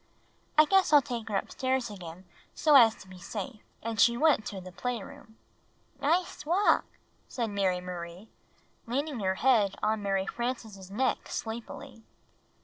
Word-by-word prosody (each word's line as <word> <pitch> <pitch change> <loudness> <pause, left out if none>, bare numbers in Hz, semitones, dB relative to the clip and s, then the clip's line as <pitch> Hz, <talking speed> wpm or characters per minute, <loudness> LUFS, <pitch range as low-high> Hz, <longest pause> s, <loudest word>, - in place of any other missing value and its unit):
"I 310 - +8
guess 385 +2 +3
I'll 295 -2 +7
take 235 -3 -5
her 205 - +1
upstairs 260 +2 -2
again 180 -2 -10 0.3
so 305 - +3
as 230 -5 +8
to 190 - -15
be 185 -1 -12
safe." 220 +5 -6 0.2
And 225 -2 -1
she 235 +2 +5
went 295 -6 +3
to 195 - -5
the 185 0 -10
playroom. 220 +2 -6 0.6
"Nice 335 +5 0
walk," 355 +7 +3 0.4
said 235 -3 -3
IMary 190 -3 0
Marie, 180 +2 -7 0.6
leaning 275 +2 -2
her 190 -2 0
head 220 -4 +3
on 215 0 +1
Mary 195 -1 0
Frances' 220 -5 -5
neck 250 +6 -1
sleepily. 225 0 -6
225 Hz, 145 wpm, -29 LUFS, 195-260 Hz, 0.6 s, I